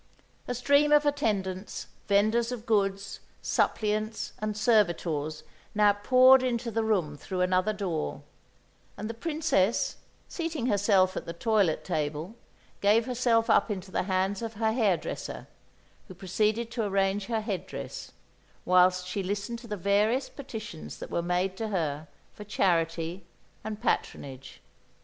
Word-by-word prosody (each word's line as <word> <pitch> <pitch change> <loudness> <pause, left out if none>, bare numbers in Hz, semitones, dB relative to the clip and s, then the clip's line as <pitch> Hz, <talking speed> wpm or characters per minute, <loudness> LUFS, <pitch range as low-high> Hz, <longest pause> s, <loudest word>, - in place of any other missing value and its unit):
A 245 - -2
stream 285 +4 +3
of 295 0 +5
attendants, 205 -9 -1 0.2
vendors 220 +4 +2
of 240 -2 -6
goods, 200 -3 0 0.2
suppliants 215 +1 0
and 215 -1 -3
servitors 170 - +1 0.3
now 210 -1 +5
poured 255 +5 +6
into 240 -2 -1
the 225 +1 0
room 185 -9 0
through 180 +5 -4
another 185 +3 +2
door; 180 - -3 0.7
and 210 +1 -4
the 230 - -4
Princess, 290 - 0 0.3
seating 325 -7 -3
herself 200 -4 +3
at - - -5
the 170 - -4
toilet 200 -2 +1
table, 155 +5 -3 0.5
gave 215 +3 +4
herself 240 -2 +2
up 230 - +4
into 190 -2 -5
the - - 0
hands 190 +2 0
of 225 -1 -5
her 220 +1 +1
hairdresser, 205 -9 -1 0.6
who 185 - -11
proceeded 215 +5 0
to 235 -1 -2
arrange 195 0 0
her 225 -2 -1
head 190 -4 -4
dress - - -7 0.5
whilst 180 0 +4
she 180 +2 -3
listened 205 +5 -3
to 235 - -12
the 210 -2 -4
various 210 +8 +2
petitions 220 - -8
that - - -8
were 170 - 0
made 180 +2 0
to 225 - -2
her 160 -6 -2 0.3
for 210 - -9
charity 170 -3 0 0.4
and 215 -1 -5
patronage. 135 - -3
205 Hz, 140 wpm, -28 LUFS, 185-230 Hz, 0.7 s, poured